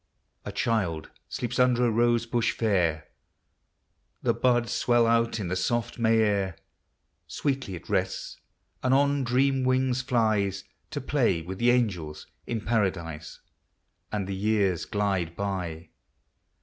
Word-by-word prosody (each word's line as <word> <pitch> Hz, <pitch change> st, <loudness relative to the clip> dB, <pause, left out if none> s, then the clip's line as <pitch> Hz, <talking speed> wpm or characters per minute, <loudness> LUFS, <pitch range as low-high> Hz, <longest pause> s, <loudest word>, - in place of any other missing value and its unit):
A -, -, -4 dB
Child 95 Hz, -9 st, -1 dB, 0.2 s
sleeps 125 Hz, +1 st, -3 dB
under 125 Hz, -1 st, +4 dB
a 120 Hz, -, +2 dB
rose 120 Hz, +1 st, +2 dB
bush 120 Hz, -1 st, 0 dB
fair, 85 Hz, -8 st, +1 dB, 1.2 s
The -, -, +3 dB
buds 120 Hz, -2 st, +1 dB
swell 120 Hz, -1 st, +3 dB
out 115 Hz, 0 st, +2 dB
in 100 Hz, -, -3 dB
the 90 Hz, -, -1 dB
soft 120 Hz, +5 st, -1 dB
May 115 Hz, -1 st, +4 dB
air; 100 Hz, -4 st, +1 dB, 0.7 s
Sweetly 135 Hz, -9 st, -2 dB
it 85 Hz, -, -11 dB
rests, -, -, -2 dB, 0.4 s
and 130 Hz, 0 st, +3 dB
on 140 Hz, 0 st, +2 dB
dream 130 Hz, +2 st, +2 dB
wings 130 Hz, 0 st, +1 dB
flics 110 Hz, -6 st, +1 dB, 0.3 s
To -, -, -4 dB
play 80 Hz, -, +1 dB
with 95 Hz, +3 st, -7 dB
the 120 Hz, -, +3 dB
angels 95 Hz, -11 st, 0 dB, 0.2 s
in 115 Hz, -2 st, -2 dB
Paradise. 90 Hz, -8 st, -2 dB, 0.7 s
And 105 Hz, -2 st, -2 dB
the 95 Hz, -, -4 dB
years 100 Hz, -3 st, +1 dB
glide 95 Hz, -5 st, -1 dB
by. 90 Hz, -5 st, -4 dB
110 Hz, 135 wpm, -27 LUFS, 95-120 Hz, 1.2 s, under